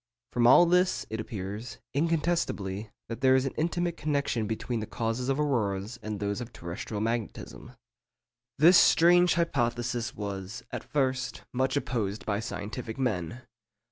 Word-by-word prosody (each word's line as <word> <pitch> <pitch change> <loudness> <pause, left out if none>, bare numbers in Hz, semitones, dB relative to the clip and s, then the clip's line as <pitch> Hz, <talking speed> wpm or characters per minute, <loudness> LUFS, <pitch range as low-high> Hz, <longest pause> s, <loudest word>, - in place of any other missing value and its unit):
_From 120 -1 +4
all 155 +8 +8
this, 180 +2 +2
it 110 - -3
appears, 105 +2 -6 0.2
incontestably, 145 - 0 0.2
that 115 - -6
there 130 0 +5
is 130 0 +2
an 135 - -2
intimate 170 +1 -1
connection 140 -7 -1
between 115 +2 -2
the 110 - -4
causes 115 +3 -2
of 135 +2 +1
auroras 110 -6 -1
and 105 -1 -4
those 100 +3 -2
of 120 - -7
terrestrial 85 +5 -6
magnetism._' 115 +2 -4 0.8
This 170 +5 +7
strange 175 +2 +5
hypothesis 120 -7 -1
was, 100 +2 -5
at - - -4
first, 130 -3 -1
much 130 +2 +1
opposed 110 -6 -2
by 100 -1 0
scientific 110 +1 -5
men. 120 -2 -2
120 Hz, 140 wpm, -28 LUFS, 105-140 Hz, 0.8 s, all